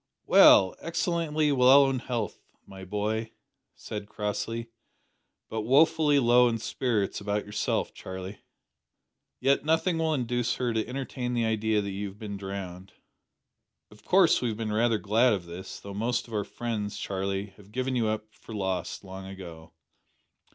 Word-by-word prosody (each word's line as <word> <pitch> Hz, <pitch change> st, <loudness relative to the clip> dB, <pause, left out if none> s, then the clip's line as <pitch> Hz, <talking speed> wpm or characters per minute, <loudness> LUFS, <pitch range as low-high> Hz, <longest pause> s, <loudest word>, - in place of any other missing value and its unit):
"Well 95 Hz, -1 st, +7 dB
excellently 165 Hz, -3 st, 0 dB
well 135 Hz, +1 st, +6 dB
in 135 Hz, -1 st, 0 dB
health, 120 Hz, -5 st, -3 dB, 0.3 s
my 95 Hz, -1 st, -11 dB
boy," 105 Hz, +3 st, -2 dB, 0.4 s
said 105 Hz, -1 st, -7 dB
Crossley, 115 Hz, +3 st, -3 dB, 0.8 s
"but 110 Hz, -, -3 dB
woefully 150 Hz, +5 st, +4 dB
low 125 Hz, -1 st, +5 dB
in 115 Hz, -, -1 dB
spirits 110 Hz, -3 st, -1 dB
about 105 Hz, +1 st, -2 dB
yourself 105 Hz, 0 st, -1 dB
Charlie. 95 Hz, +2 st, -8 dB, 1.0 s
Yet 140 Hz, +1 st, +2 dB
nothing 165 Hz, +2 st, +1 dB
will 160 Hz, -1 st, +1 dB
induce 120 Hz, -2 st, -1 dB
her 120 Hz, -2 st, -1 dB
to 110 Hz, -1 st, -1 dB
entertain 125 Hz, -1 st, -4 dB
the 120 Hz, -1 st, +1 dB
idea 110 Hz, -1 st, +1 dB
that 100 Hz, -, -4 dB
you 100 Hz, +1 st, -4 dB
have 95 Hz, +1 st, -11 dB
been 105 Hz, -2 st, -6 dB
drowned. 95 Hz, -1 st, -7 dB, 1.0 s
Of 105 Hz, -, -18 dB
course 180 Hz, -3 st, +4 dB
we 125 Hz, -, 0 dB
have 110 Hz, -2 st, -3 dB
been 110 Hz, -2 st, -3 dB
rather 115 Hz, +1 st, +2 dB
glad 110 Hz, +4 st, +3 dB
of 95 Hz, -4 st, -3 dB
this 85 Hz, +2 st, -8 dB
though 100 Hz, -, -9 dB
most 120 Hz, +4 st, -1 dB
of 115 Hz, -, -12 dB
our 105 Hz, -2 st, -1 dB
friends, 110 Hz, -4 st, -4 dB
Charlie, 95 Hz, 0 st, -3 dB
have 105 Hz, -1 st, -17 dB
given 130 Hz, +2 st, -2 dB
you 115 Hz, -3 st, +1 dB
up 110 Hz, 0 st, -3 dB
for 110 Hz, -, -11 dB
lost 95 Hz, -1 st, -3 dB
long 95 Hz, 0 st, -9 dB
ago. 85 Hz, -4 st, -10 dB
110 Hz, 160 wpm, -28 LUFS, 100-125 Hz, 1.0 s, Well